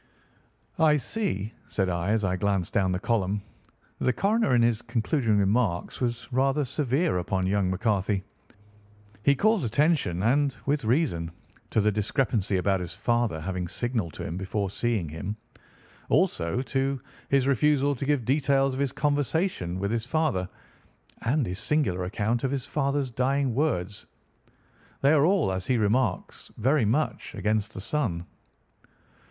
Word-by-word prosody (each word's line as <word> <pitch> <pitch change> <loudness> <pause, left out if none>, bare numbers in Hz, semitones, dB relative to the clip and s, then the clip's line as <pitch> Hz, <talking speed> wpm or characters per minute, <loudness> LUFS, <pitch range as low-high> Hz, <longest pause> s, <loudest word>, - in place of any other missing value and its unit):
"I 155 -2 +5
see," 130 - -2 0.2
said 95 -2 0
I 85 0 -1
as 105 -1 +2
I 95 -1 0
glanced 95 -2 -1
down 95 -2 +2
the 90 - -1
column, 105 -2 0 0.6
"that - - -2
the 125 - +4
coroner 200 - +2
in 120 - +4
his 115 -1 +2
concluding 115 -1 0
remarks 100 -1 0
was 120 -1 -2
rather 135 +3 +2
severe 140 - 0
upon 95 +1 -1
young 95 0 +1
McCarthy. 100 0 0 1.0
He 140 +5 +4
calls 215 +3 +2
attention, 120 - +1
and 135 +3 +2
with 140 -3 0
reason, 110 - +1 0.4
to - - +1
the 105 +1 +3
discrepancy 105 -1 0
about 95 +1 +1
his 85 -1 -5
father 115 -3 0
having 90 +1 -3
signalled 115 -4 -2
to - - -6
him 85 - -4
before 95 +1 -2
seeing 110 -5 -1
him, 95 +7 -5 0.7
also 85 +10 +1
to 135 0 -1 0.3
his 135 -2 +3
refusal 140 +1 +3
to 130 - -5
give 140 -4 +1
details 135 0 +2
of 130 - -4
his 140 -2 0
conversation 145 - 0
with 100 +2 -2
his 115 0 -2
father, 135 - 0 0.7
and 130 +4 +1
his 90 +1 -4
singular 95 - 0
account 110 +5 -1
of 135 - +1
his 135 -1 -2
father's 140 -2 -1
dying 130 +1 +1
words. 105 - -1 0.9
They 140 - +5
are 150 -1 +5
all, 180 - +2
as 95 +4 -3
he 130 -2 +2
remarks, 110 -1 0
very 130 +2 +2
much 135 +9 -1
against 105 0 -1
the 95 - -5
son." 100 - -1
115 Hz, 155 wpm, -27 LUFS, 95-140 Hz, 1.0 s, I